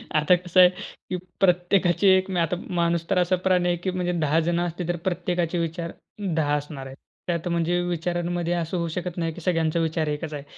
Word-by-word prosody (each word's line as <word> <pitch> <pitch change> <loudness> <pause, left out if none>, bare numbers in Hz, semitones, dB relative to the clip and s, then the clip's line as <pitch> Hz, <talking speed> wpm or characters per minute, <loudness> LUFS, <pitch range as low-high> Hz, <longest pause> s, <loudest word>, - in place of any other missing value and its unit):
आता 155 +4 +5
कसं 180 +1 0
आहे, 180 - +9 0.4
की 185 - -1 0.2
प्रत्येकाची 180 +1 +3
एक 190 0 +4
मी 180 - 0
आता 165 +1 +1 0.2
माणूस 170 0 0
तर 195 - +2
असा 180 +1 +3
प्राणी 180 -1 +3
आहे, 175 - +1
की 185 +2 -2
म्हणजे 180 -1 -1
10 155 +1 +3
जण 170 +1 0
असतील 175 0 -3
तर 175 - 0
प्रत्येकाचे 175 -1 -1
विचार 165 +1 -3 0.4
10 145 -2 +2
असणार 145 -2 -7
आहेत. 135 0 -10 0.3
त्यात 170 -1 -1
म्हणजे 170 +1 +1
विचारांमध्ये 175 0 -1
असं 170 +1 -2
होऊ 170 -1 -1
शकत 180 +1 -4
नाही, 165 -1 -1
की 175 - -10
सगळ्यांचा 165 -1 +1
विचार 160 -1 0
एकच 150 +1 -3
आहे. 145 -1 -5
175 Hz, 205 wpm, -25 LUFS, 165-180 Hz, 0.4 s, आहे